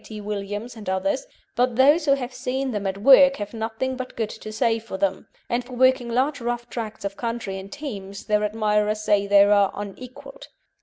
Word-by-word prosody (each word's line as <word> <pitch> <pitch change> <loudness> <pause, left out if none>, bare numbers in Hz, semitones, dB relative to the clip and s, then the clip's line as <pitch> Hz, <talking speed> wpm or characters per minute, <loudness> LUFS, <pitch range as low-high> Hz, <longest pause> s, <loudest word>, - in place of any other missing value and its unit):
T. 215 -1 -9
Williams 205 +3 -5
and 210 -4 -7
others, 290 - -1 0.3
but 250 -1 +1
those 290 +6 +5
who 280 - +5
have 255 -2 -6
seen 265 +1 -2
them 205 -3 -2
at 190 0 -3
work 275 +5 +7
have 205 -2 -6
nothing 225 +3 -3
but 255 0 -7
good 225 -2 -2
to 215 -1 -9
say 225 +1 +1
of 220 -4 -7
them, 190 -1 -1 0.2
and 240 +1 -1
for 250 +1 -12
working 255 -1 +3
large 265 +4 0
rough 240 0 -3
tracts 220 -3 -5
of 200 0 -3
country 230 -5 -4
in 190 +1 -10
teams 200 -7 -7
their 210 0 +1
admirers 210 0 0
say 205 -1 +2
they 200 0 +7
are 200 -1 +4
unequalled. 250 - -9
225 Hz, 200 wpm, -23 LUFS, 205-255 Hz, 0.3 s, work